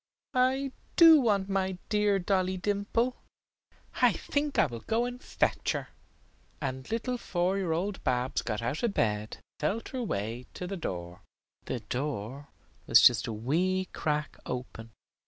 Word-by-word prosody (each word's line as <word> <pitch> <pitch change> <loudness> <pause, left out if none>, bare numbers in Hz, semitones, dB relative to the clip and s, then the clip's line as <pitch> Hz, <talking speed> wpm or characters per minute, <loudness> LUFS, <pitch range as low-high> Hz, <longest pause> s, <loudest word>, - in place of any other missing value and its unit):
I 260 +2 +2 0.2
do 330 -3 +9
want 200 -5 +2
my 190 -1 -1
dear 210 -2 +3
Dolly 185 0 0
Dimple. 205 +6 0 0.8
I - - +7
think 290 0 -2
I - - +6
will 120 -6 -5
go 225 - 0
and 245 0 -6
fetch - - 0
her." - - -4 0.7
And 130 -2 -4
little 240 +2 -2
four 185 0 0
year 180 -4 -1
old 185 +5 -2
Babs 125 +1 0
got 110 -1 -3
out 125 +6 -2
of 230 -4 0
bed 105 -1 0
and - - -22 0.2
felt 200 +10 -1
her 260 - -4
way 115 - -3
to 180 - -5
the 195 +2 -4
door. 90 - -5 0.4
The - - -3
door 135 0 -4 0.4
was - - +8
just - - +6
a - - -2
wee 175 +12 0
crack 150 -1 -2
open. 125 -3 -5
185 Hz, 155 wpm, -29 LUFS, -, 0.8 s, do